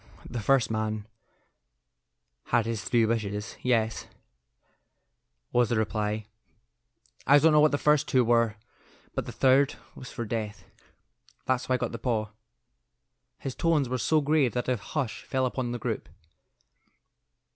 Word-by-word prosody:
"The 120 - -5
first 125 +2 +2
man 110 -1 -2 1.4
had 115 - +2
his 115 -5 -3
three 115 +2 +2
wishes. 105 -2 -2
Yes," 115 -3 0 1.4
was 120 -2 +3
the 120 - +1
reply; 105 0 -1 1.0
"I 140 - +8
don't 160 +3 +5
know 150 - +5
what 155 +1 +6
the 145 - 0
first 150 0 +3
two 130 -2 +3
were, 115 -2 +3 0.6
but - - -3
the - - -5
third 135 +1 +3 0.2
was 130 - -10
for 120 - -4
death. 110 -1 -4 0.8
That's 130 -1 0
how 130 - +2
I - - +1
got 125 -1 -3
the 115 - -6
paw." 110 -3 -1 1.1
His 135 - -5
tones 160 -4 +1
were 130 +1 -2
so 155 +5 +2
grave 145 -3 +2
that 125 -1 -2
a 125 - +2
hush 130 +2 -4
fell 130 -1 -1
upon 125 -1 -2
the 120 - -2
group. - - -4
120 Hz, 145 wpm, -27 LUFS, 110-135 Hz, 1.4 s, I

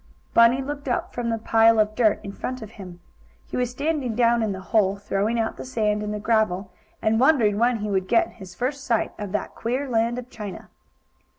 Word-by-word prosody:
Bunny 235 +3 +5
looked 285 +1 -6
up 245 - -1
from 240 -1 -2
the 225 - 0
pile 225 0 +4
of 215 0 +2
dirt 215 -2 +2
in 200 - -6
front 255 +4 -5
of 215 - -10
him. 180 -6 -11 0.4
He - - -7
was 250 -1 0
standing 280 -2 -2
down 235 0 +3
in 220 -2 0
the 190 - -5
hole, 200 -3 +4
throwing 205 +3 -1
out 225 0 -1
the - - -6
sand 215 -4 0
and 210 0 -3
the 210 - -3
gravel, 205 -4 0 0.3
and 220 0 +2
wondering 240 -7 +4
when 240 0 +3
he 210 0 -2
would 190 -1 0
get 340 - +2
his 185 -2 -10
first 265 +6 -2
sight 230 -5 0
of 205 -2 -5
that 210 - -2
queer 255 +5 -2
land 235 0 +1
of 250 -1 -6
China. 205 -5 -8
225 Hz, 215 wpm, -24 LUFS, 210-245 Hz, 0.4 s, Bunny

